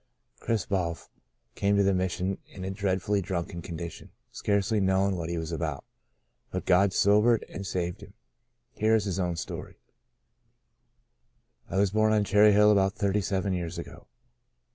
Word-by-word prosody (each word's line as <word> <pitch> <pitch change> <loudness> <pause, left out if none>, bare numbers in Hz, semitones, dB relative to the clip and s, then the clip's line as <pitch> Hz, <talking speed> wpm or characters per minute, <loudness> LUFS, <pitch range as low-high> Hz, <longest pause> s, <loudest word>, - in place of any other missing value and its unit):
Chris 115 -3 -1
Balf 85 -4 -2 0.4
came 100 0 +1
to 100 - +4
the 100 0 +3
Mission 95 +1 -1
in 95 -1 -9
a 95 - -3
dreadfully 100 +1 0
drunken 85 -1 -4
condition, 85 0 -7 0.2
scarcely 105 +2 0
knowing 95 0 +2
what 85 -2 -4
he 85 - -2
was 80 0 -4
about. 75 -3 -3 0.6
But - - -4
God 95 +2 +4
sobered 105 +4 +3
and 100 0 -7
saved 90 -2 -3
him. - - -13 0.6
Here 110 +1 +2
is 105 -2 +1
his 95 -2 -2
own 90 -2 -1
story: - - -7 1.0
" - - -41
I 95 - -3
was 100 -1 +3
born 110 +1 +3
on 105 -1 +3
Cherry 105 +1 +5
Hill 105 +1 +6
about 95 -1 +3
thirty 100 0 0
seven 95 0 -1
years 85 -1 -4
ago. 85 - -9
95 Hz, 165 wpm, -28 LUFS, 90-100 Hz, 1.0 s, Hill